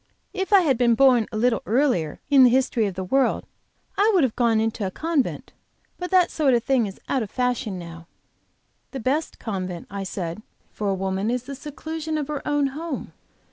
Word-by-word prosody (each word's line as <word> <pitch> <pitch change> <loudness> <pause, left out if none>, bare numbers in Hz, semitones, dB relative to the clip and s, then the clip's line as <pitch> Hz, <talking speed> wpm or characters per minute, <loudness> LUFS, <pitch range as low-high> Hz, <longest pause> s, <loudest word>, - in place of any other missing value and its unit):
If 385 0 -3
I 400 -2 +7
had 270 -8 +1
been 235 -2 +4
born 250 -3 +5
a 215 - -4
little 230 -1 +2
earlier 230 - +1
in 275 -3 +6
the 250 - +7
history 245 -3 +2
of 190 - -5
the 190 - -3
world, 270 +8 +1 0.5
I 415 +2 +5
would 350 - +4
have 250 -4 0
gone 230 -3 +2
into 220 -1 -1
a 190 - -1
convent; 315 - -2 0.5
but 360 0 -4
that 370 -2 +4
sort 280 -5 +2
of 235 - 0
thing 250 -5 +2
is 195 - -9
out 265 - 0
of 215 - -4
fashion 250 -5 -1
now." 170 -1 -10 0.9
"The 270 - -4
best 280 +7 -1
convent," 185 -6 -5
I 200 0 -4
said, 180 -1 -5 0.3
"for 205 -1 -3
a 195 - +1
woman 190 +2 -2
is 245 0 -1
the 275 +2 -7
seclusion 310 +3 -5
of 300 -1 -3
her 295 -2 -3
own 290 -1 +2
home. 315 -1 -5
250 Hz, 205 wpm, -24 LUFS, 205-290 Hz, 0.9 s, I